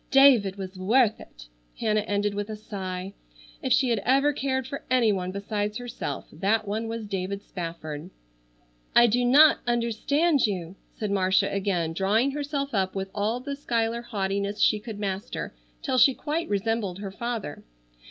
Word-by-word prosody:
David 260 -8 +6
was 190 -1 -7
worth 220 +3 +3
it." - - -13 0.3
Hannah 215 -1 +2
ended 205 -1 -1
with 205 +1 -4
a 215 - -4
sigh. 190 -3 -6 0.5
If - - -2
she 260 - +4
had 225 - +2
ever 275 +7 +3
cared 265 -2 -1
for 275 +2 -6
any 245 -4 +4
one 185 -2 -2
besides 205 +2 -3
herself 245 -1 -5
that 215 +2 0
one 220 +3 -2
was 225 -1 -4
David 200 0 -4
Spafford. 165 -2 -6 0.9
"I 240 - +8
do 240 +2 +2
not 285 +5 +6
understand 245 +5 +2
you," 180 -3 -4 0.2
said 210 -2 -3
Marcia 190 -1 +2
again, 185 -5 0
drawing 210 +9 +2
herself 280 -1 -3
up 190 -2 0
with 195 0 -3
all 215 +4 -1
the 280 +2 -4
Schuyler 235 -4 -1
haughtiness 200 -2 -2
she 215 - +4
could 215 0 -7
master, 195 - -4 0.3
till 255 - +1
she 270 0 +6
quite 315 +3 -3
resembled 205 -2 -1
her 200 -1 -6
father. 230 -7 -5
210 Hz, 160 wpm, -26 LUFS, 195-245 Hz, 0.9 s, I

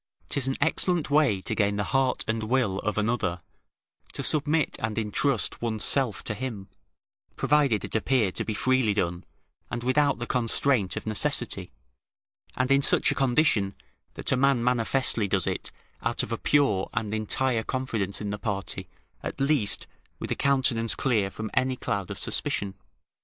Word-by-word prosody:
'Tis 135 -2 +1
an 135 - 0
excellent 165 -1 +1
way 140 -10 +3
to - - -3
gain 100 -1 +1
the 105 - -1
heart 135 -1 +2
and 110 0 -1
will 110 -4 0
of 105 +1 -3
another, 105 -5 0 0.8
to - - -5
submit 155 +1 +1
and 110 -3 -3
intrust 110 +1 +1
one's 110 -2 0
self 130 -6 +2
to - - -3
him, 110 -4 -6 0.7
provided 140 -8 +2
it - - -10
appear 110 -2 +1
to - - -3
be 110 - -3
freely 130 -3 +2
done, 90 -2 -1 0.5
and 120 0 -4
without 140 +2 +2
the 120 - -4
constraint 120 -4 +2
of - - -5
necessity, 110 - +1 0.9
and 130 +1 0
in 140 0 +5
such - - +3
a - - -2
condition, 120 -7 +2 0.4
that - - -1
a - - +4
man 135 -2 +2
manifestly 120 -2 +1
does 95 -2 +1
it - - -3 0.3
out 115 0 0
of - - -6
a 115 - -1
pure 120 -10 +2
and 105 -1 -2
entire 115 +3 0
confidence 110 -6 -2
in 105 -1 -4
the 105 - -4
party, 100 -3 -4 0.3
at - - -6
least, 135 -6 +2 0.3
with - - -6
a - - +1
countenance 130 -5 +2
clear 110 -7 +1
from 110 +2 -6
any 130 0 +1
cloud 100 -6 -3
of - - -6
suspicion. 100 -1 -1
115 Hz, 170 wpm, -26 LUFS, 105-135 Hz, 0.9 s, in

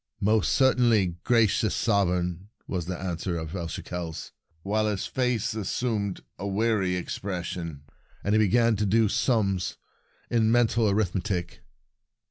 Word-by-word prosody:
"Most 110 0 +2
certainly, 115 -9 +3
gracious 110 -2 +3
sovereign," 90 -3 0 0.2
was 90 -3 -3
the 90 -1 -3
answer 90 -1 -3
of 80 +2 -5
El 85 -3 -3
Shekels, 85 -1 -6 0.3
while 110 +2 +1
his 105 -3 -1
face 125 -5 0
as 110 -4 -3
sumed 105 -6 -1 0.2
a 100 - -3
weary 100 -2 +1
expression, 90 -5 -4 0.4
and 100 - +1
he 110 - +4
began 115 +2 +3
to 105 0 0
do 110 +2 +4
sums 100 -5 0 0.5
in 115 -2 +2
mental 115 -2 +3
arithmetic. 95 -2 -1
100 Hz, 130 wpm, -27 LUFS, 90-110 Hz, 0.5 s, he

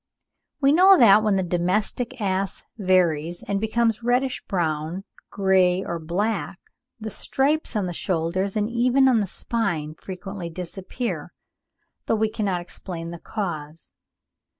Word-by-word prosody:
We 275 0 +5
know 375 +5 +7
that, 215 -4 +7
when 210 -2 +2
the 190 - +1
domestic 195 +8 -1
ass 195 -1 -2
varies 175 -4 +1
and 200 0 -2
becomes 225 0 +1
reddish 250 +2 0
brown, 165 0 -2 0.3
grey, 190 -1 +2
or 170 -1 -3
black, 195 +5 -2 0.4
the 220 0 -5
stripes 285 +4 0
on 205 -3 +1
the 175 - -3
shoulders 185 +4 -1
and 210 -1 +1
even 250 +3 +3
on 250 -3 +4
the 205 - -1
spine 170 -8 -2
frequently 185 +1 -7
disappear, 185 +7 -5 0.7
though - - +2
we 220 0 +1
cannot 195 -5 -1
explain 175 -1 -7
the 170 - -8
cause. 160 -7 -5
195 Hz, 135 wpm, -24 LUFS, 175-225 Hz, 0.7 s, know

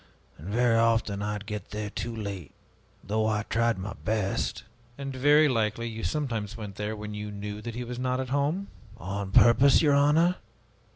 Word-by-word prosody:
And 80 - -9
very 115 +1 +3
often 115 -3 +1
I 105 0 -2
would 105 -1 -6
get 105 -2 -6
there 105 -1 -4
too 115 0 -4
late, 100 -7 -6 0.5
though 110 +2 0
I 105 -1 0
tried 115 0 +1
my 100 +2 -5
best." 105 -3 -1 0.3
"And 135 -1 -5
very 145 +4 +5
likely 115 -2 0
you 115 -1 -6
sometimes 115 -9 -2
went 105 -3 -7
there 105 +1 -3
when 105 0 -7
you 105 0 -5
knew 105 +1 -6
that 115 0 -6
he 125 - -3
was 120 0 -6
not 125 0 0
at 130 -1 -3
home?" 145 +8 0 0.3
"On 100 -1 -4
purpose, 130 +8 +6
your 145 -2 +4
honor? 150 +5 +4
115 Hz, 185 wpm, -27 LUFS, 105-130 Hz, 0.5 s, purpose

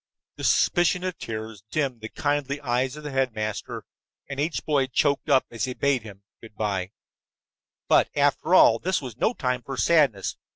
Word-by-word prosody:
The - - -8
suspicion 175 0 +3
of 185 -2 -4
tears 110 -2 -6
dimmed 130 -2 -2
the 110 - -6
kindly 145 -1 -1
eyes 125 0 -1
of 150 - -10
the 150 - -5
headmaster, 110 -6 -2 0.4
and 140 0 -6
each 155 +3 -2
boy 140 -3 +2
choked 140 +4 0
up 135 -2 +4
as 115 -3 -2
he 130 -1 -5
bade 140 -3 +1
him 100 -2 -12 0.2
good 110 -2 -14
by. 100 -4 -2 1.0
But, - - +4
after 145 +5 +2
all, 115 -9 +6
this 185 +6 0
was 125 -5 -8
no 220 - 0
time 125 -2 -1
for 135 +3 -7
sadness. 140 - +2
130 Hz, 175 wpm, -25 LUFS, 110-145 Hz, 1.0 s, all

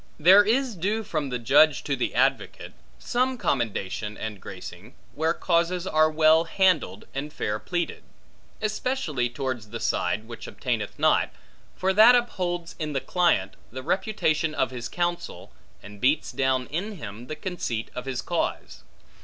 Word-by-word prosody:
There 185 +6 +8
is 240 +2 +1
due 205 +6 -1
from 155 -8 -3
the 125 - -2
judge 140 +5 +4
to 140 - -1
the 125 - -2
advocate, - - 0 0.2
some 255 - 0
commendation 105 - -2
and 105 -3 -6
gracing, - - -10 0.2
where 160 +1 0
causes 175 +1 +1
are 155 -3 +3
well 155 +1 +4
handled 165 - +1
and 145 +2 -4
fair 105 -6 -2
pleaded; 175 - -3 0.6
especially 215 - -1
towards 125 -4 -4
the 115 +1 -6
side 110 0 -1
which 115 -1 -8
obtaineth - - -3
not; - - +3 0.5
for 190 +1 +1
that 220 +5 +8
upholds 180 -8 -1
in 155 -2 -3
the 135 - +1
client, 135 - +1 0.2
the 130 +2 -7
reputation 165 -4 0
of - - 0
his 120 -2 -6
counsel, 175 0 -3 0.3
and 105 0 -12
beats 145 +4 +2
down 130 -1 +1
in 195 +8 -3
him 115 - -8
the 155 - -4
conceit 150 - -4
of 125 - -6
his 130 -2 -3
cause. - - -3
155 Hz, 155 wpm, -26 LUFS, 125-185 Hz, 0.6 s, There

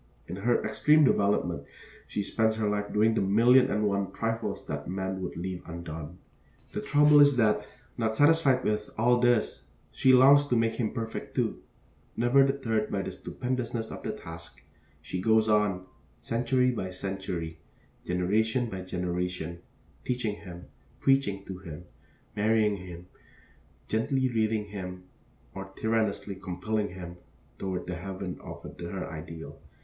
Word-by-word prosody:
In 90 - -6
her 120 +4 +2
extreme 155 +1 +4
development 100 - +2 0.4
she 105 - -2
spends 110 +2 +1
her 110 -1 0
life 105 0 -1
doing 110 +2 +3
the - - +1
million 120 +7 +5
and 105 -3 0
one 100 -1 0
trifles 115 0 -3
that 75 0 -5
man 95 0 -3
would 90 - -5
leave 90 +1 -4
undone. 85 -1 -7 0.5
The - - -3
trouble 150 0 +5
is 145 -2 +6
that, 105 -2 +2 0.3
not 110 -1 0
satisfied 145 -2 +4
with 105 0 -1
all 120 +2 +4
this, 120 -2 +2 0.3
she 130 - +4
longs 140 +3 +7
to 125 - +1
make 115 -1 +2
him 115 -2 -1
perfect, 115 -2 -5
too. - - -1 0.6
Never 120 +4 +5
deterred 125 -6 0
by 100 -1 -1
the - - -4
stupendousness 120 -3 -3
of - - -7
the - - -3
task, 80 -5 -9 0.4
she 90 - -4
goes 110 +2 +4
on, 105 -4 +2 0.3
century 125 +2 +1
by 95 -6 -3
century, 90 -3 -4 0.4
generation 110 +7 +1
by 95 -1 -4
generation, 90 -1 -3 0.4
teaching 115 -5 -2
him, 90 -3 -10 0.3
preaching 120 -8 +2
to 95 -1 -7
him, 85 -2 -9 0.5
marrying 105 -1 +2
him; 90 -1 -9 0.8
gently 130 +4 +1
leading 110 -2 0
him 90 -2 -6 0.5
or 95 0 -6
tyrannously 110 -2 0
compelling 95 +3 -2
him 90 -1 -8 0.4
toward 95 -2 -3
the 90 0 -4
heaven 95 0 -6
of - - -9
her 90 +2 -4
ideal. 80 0 -8
105 Hz, 145 wpm, -28 LUFS, 90-115 Hz, 0.8 s, longs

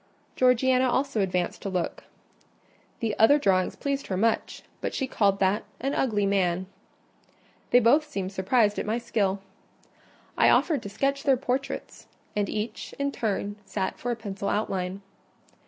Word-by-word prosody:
Georgiana 255 0 +3
also 265 -3 0
advanced 180 -2 -1
to 195 - -3
look. 180 -2 -3 1.0
The 220 -3 -1
other 225 +7 +7
drawings 190 -9 +1
pleased 280 -1 -3
her 185 - -2
much, 225 +3 0 0.2
but - - -3
she 270 - 0
called 200 -6 +1
that 195 +2 +2 0.2
"an 275 +3 -1
ugly 210 -6 +1
man." 185 -2 +1 1.0
They 245 - +6
both 285 +6 +4
seemed 195 -7 -3
surprised 205 +2 +2
at - - -3
my 220 +2 +1
skill. 200 -4 -1 1.0
I - - +6
offered 310 -5 +3
to 200 - -7
sketch 275 +7 0
their 275 -3 +3
portraits; 265 +1 -4 0.3
and 205 -1 0
each, 215 +2 -4
in 280 0 -1
turn, 205 -4 -2
sat 195 -1 -3
for 245 - -3
a 240 - 0
pencil 200 -3 -4
outline. 190 -2 -2
215 Hz, 155 wpm, -27 LUFS, 195-260 Hz, 1.0 s, other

